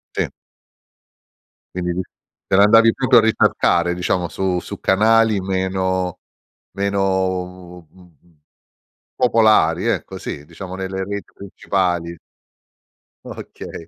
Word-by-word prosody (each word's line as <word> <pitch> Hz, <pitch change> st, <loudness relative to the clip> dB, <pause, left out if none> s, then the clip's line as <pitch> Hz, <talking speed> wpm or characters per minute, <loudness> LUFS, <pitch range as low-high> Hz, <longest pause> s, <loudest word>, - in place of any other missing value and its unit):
Si. -, -, 0 dB, 1.5 s
Quindi 90 Hz, 0 st, -2 dB, 0.4 s
te -, -, 0 dB
l'andavi 115 Hz, +3 st, +6 dB
proprio 130 Hz, -2 st, +3 dB
a -, -, +7 dB
ricercare, 90 Hz, -5 st, +2 dB
diciamo 90 Hz, -1 st, -1 dB
su 95 Hz, -1 st, -1 dB
su -, -, -8 dB
canali 110 Hz, +1 st, +3 dB
meno 95 Hz, -1 st, -2 dB, 0.5 s
meno, 95 Hz, -3 st, -2 dB
mhmm, 85 Hz, -1 st, -23 dB, 0.8 s
popolari, 110 Hz, -6 st, +3 dB
ecco, 115 Hz, -, -2 dB
sì, 75 Hz, -, -7 dB
diciamo 90 Hz, +3 st, -9 dB
nelle 95 Hz, 0 st, -4 dB
reti 100 Hz, +1 st, -6 dB
principali. 90 Hz, -4 st, -2 dB, 1.1 s
Okay. 80 Hz, -, -9 dB
95 Hz, 95 wpm, -20 LUFS, 90-100 Hz, 1.5 s, a